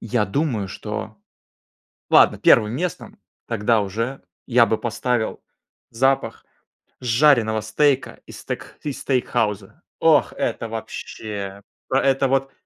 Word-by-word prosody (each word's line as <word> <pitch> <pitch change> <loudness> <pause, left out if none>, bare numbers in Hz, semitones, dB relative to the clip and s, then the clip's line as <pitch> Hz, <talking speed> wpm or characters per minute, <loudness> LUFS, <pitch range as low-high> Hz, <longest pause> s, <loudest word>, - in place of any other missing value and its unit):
я 115 -1 0
думаю, 115 -4 -1
что 110 +2 -6 0.9
Ладно, - - +6
первым 105 0 +5
местом 180 +6 -5 0.3
тогда 115 0 +2
уже 115 +7 -4 0.2
я 120 -2 +5
бы 110 - 0
поставил 120 0 -2 0.5
запах 135 +4 0 0.6
жареного 120 -3 +3
стейка 135 +5 0
из - - -10
стек - - -7
из 140 -2 -5
стейкхауза. 120 - -1 0.2
Ох, 155 -3 +4
это 115 - -2
вообще! 105 -3 -6 0.3
Это 135 0 +2
вот, 135 +1 0
120 Hz, 110 wpm, -22 LUFS, 110-135 Hz, 0.9 s, Ладно